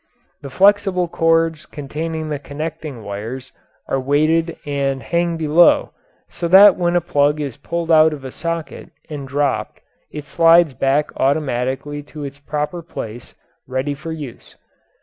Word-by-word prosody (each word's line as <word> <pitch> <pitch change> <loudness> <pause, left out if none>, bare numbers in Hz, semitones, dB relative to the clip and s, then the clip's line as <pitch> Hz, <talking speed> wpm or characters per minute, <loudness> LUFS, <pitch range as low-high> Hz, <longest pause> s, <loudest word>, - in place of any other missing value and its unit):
The 140 - -8
flexible 195 +3 +3
cords 165 -1 +1
containing 155 +2 -5
the 145 -2 -3
connecting 150 -3 -6
wires 115 +6 -6 0.4
are 135 - 0
weighted 155 +5 +1
and 140 -3 -2
hang 170 +7 0
below, 160 +2 +4 0.3
so 170 - -4
that 190 +2 +8
when 175 -1 0
a 175 - +3
plug 145 -2 +1
is 140 -5 -4
pulled 170 +3 -3
out 160 0 +6
of 145 -3 -7
a 130 - -6
socket 165 -3 -5 0.2
and 140 -2 -6
dropped 145 +1 -1 0.3
it 150 -1 -8
slides 165 -1 +4
back 135 +4 0
automatically 135 0 -1
to 150 +1 -10
its 140 0 -8
proper 150 +4 -3
place, 120 -8 -8 0.3
ready 130 +3 -2
for 155 +4 -7
use. 145 -7 -9
150 Hz, 145 wpm, -19 LUFS, 140-165 Hz, 0.4 s, that